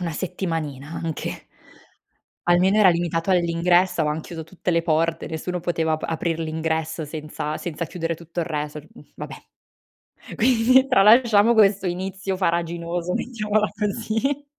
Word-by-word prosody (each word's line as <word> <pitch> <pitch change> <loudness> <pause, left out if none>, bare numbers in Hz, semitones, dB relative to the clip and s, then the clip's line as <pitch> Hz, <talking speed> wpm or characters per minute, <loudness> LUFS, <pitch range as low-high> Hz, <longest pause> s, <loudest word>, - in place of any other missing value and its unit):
1 170 -3 -3
settimanina 155 -5 -4
anche! 165 -2 -5 1.0
Almeno, 180 +3 +3
era 200 -3 +7
limitato 170 +1 0
all'ingresso, 175 0 +2
avevano 150 +1 -1
chiuso 165 0 -8
tutte 180 +2 -4
le 170 - +2
porte, 165 0 0
nessuno 175 +3 -4
poteva 165 -2 -1
ap 155 - -2
aprir 165 0 -2
l'ingresso 160 0 -2
senza 150 0 -5
senza 170 -1 -4
chiudere 165 -1 -3
tutto 170 +1 -6
il 165 - -2
resort, 150 -1 -4
mhmm, 235 - -15
va - - -6
beh! - - -15 0.7
Quindi, 255 +2 +4
tralasciamo 225 -1 +5
questo 200 -3 +4
inizio 190 +2 -3
farraginoso, 170 0 -1
mettiamola 215 -3 0
così! 225 +7 -1
175 Hz, 135 wpm, -23 LUFS, 160-195 Hz, 1.0 s, era